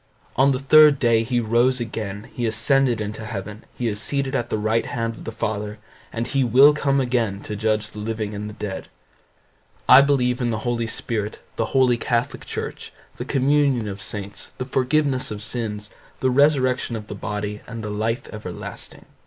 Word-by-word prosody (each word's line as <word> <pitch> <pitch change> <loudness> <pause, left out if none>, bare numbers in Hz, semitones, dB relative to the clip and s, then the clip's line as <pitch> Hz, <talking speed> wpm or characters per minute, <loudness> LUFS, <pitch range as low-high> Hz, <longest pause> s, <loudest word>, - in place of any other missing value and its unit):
On 135 +2 +4
the 130 - +1
third 150 +2 +6
day 115 -3 +3
he 120 +2 0
rose 120 +3 +2
again; 110 -3 -5
he 120 -2 -1
ascended 120 +2 +2
into 105 +1 -5
heaven, 105 -1 -6
he 120 - -1
is 105 -1 -1
seated 140 +1 -1
at 120 -3 -1
the - - 0
right 110 +2 0
hand 115 -1 -2
of - - -12
the - - -4
Father, 105 -1 -3 0.3
and 115 +1 -2
he 135 +2 +1
will 130 +5 +7
come 140 -1 +1
again 120 -6 0
to 105 - -5
judge 110 0 0
the 105 - -9
living 110 -1 -3
and 105 +1 -5
the 105 - -10
dead. 100 -3 -5 1.0
I 130 - +10
believe 130 -3 +1
in 120 - +1
the 110 0 -3
Holy 120 -1 0
Spirit, 110 -2 -3 0.2
the 115 - 0
holy 125 -2 +4
catholic 120 0 -1
church, - - -5 0.3
the - - -5
communion 135 -4 +2
of 100 -1 -6
saints, 100 +1 -5
the 125 - -3
forgiveness 130 +1 +1
of 105 -1 -5
sins, 105 -2 -4 0.3
the 130 - +1
resurrection 130 -3 +2
of 110 -1 -6
the - - -7
body, 105 0 -4
and 115 -2 -7
the 105 - -4
life 110 +4 -2
everlasting. 100 -5 -7
115 Hz, 185 wpm, -23 LUFS, 105-130 Hz, 1.0 s, I